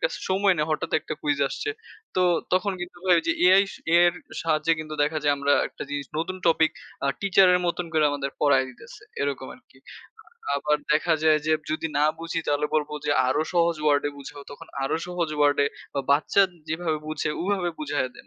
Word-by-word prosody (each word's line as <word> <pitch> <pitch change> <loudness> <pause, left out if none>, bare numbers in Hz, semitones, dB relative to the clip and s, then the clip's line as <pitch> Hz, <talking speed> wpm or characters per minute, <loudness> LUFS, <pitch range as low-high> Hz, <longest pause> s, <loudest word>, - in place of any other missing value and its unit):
কাছে - - -1
সময় 195 0 +3
নেই। 150 - +2
হঠাৎ 155 - -2
একটা - - -5
কুইজ 145 -1 0
আসছে। 430 - -4 0.5
তো 185 - +3 0.3
তখন 190 +2 +2
কিন্তু 175 0 -7
ভাই 180 - +6
এই - - -1
যে - - +4
Ai 190 +2 +7 0.3
Ai - - +7
এর 175 - +3 0.3
সাহায্যে 160 0 +1
কিন্তু 155 0 -7
দেখা 155 +2 0
যায় 145 - +4
আমরা 140 0 +1 0.2
একটা - - -9
জিনিস 145 -1 -3
নতুন 185 +3 -3
টপিক 160 -1 +4 0.3
আ - - +2
টিচার 195 -1 +5
এর 180 - +2
মতন 175 0 -2
করে 155 -1 +3
আমাদের 140 -1 -3
পড়ায় 140 -3 +4
দিতেছে। 230 - -14 0.2
এরকম - - -3
আরকি। - - -24 0.8
আবার 150 +1 +1 0.2
দেখা 160 +2 +2
যায় 155 -1 +5
যে 155 - +3 0.2
যদি 160 +1 -2
না 145 - +3 0.2
বুঝি 165 0 -3
তাহলে 145 +1 +1
বলব 150 -1 0 0.2
যে - - +1 0.2
আরো 130 - +1
সহজ 170 -1 +3
ওয়ার্ডে 145 -1 +2
বুঝাও 140 +1 -9
তখন 145 - -11 0.2
আরো 135 - 0
সহজ 175 -2 -2
ওয়ার্ডে 145 -1 +3 0.3
বা 140 - 0
বাচ্চা 150 +7 +4 0.3
যেভাবে 160 -1 -1
বুঝে 155 -1 -2
ওভাবে 185 -2 0
বুঝাইয়া 145 -4 -2
দেয়। - - -15
155 Hz, 195 wpm, -25 LUFS, 145-175 Hz, 0.8 s, Ai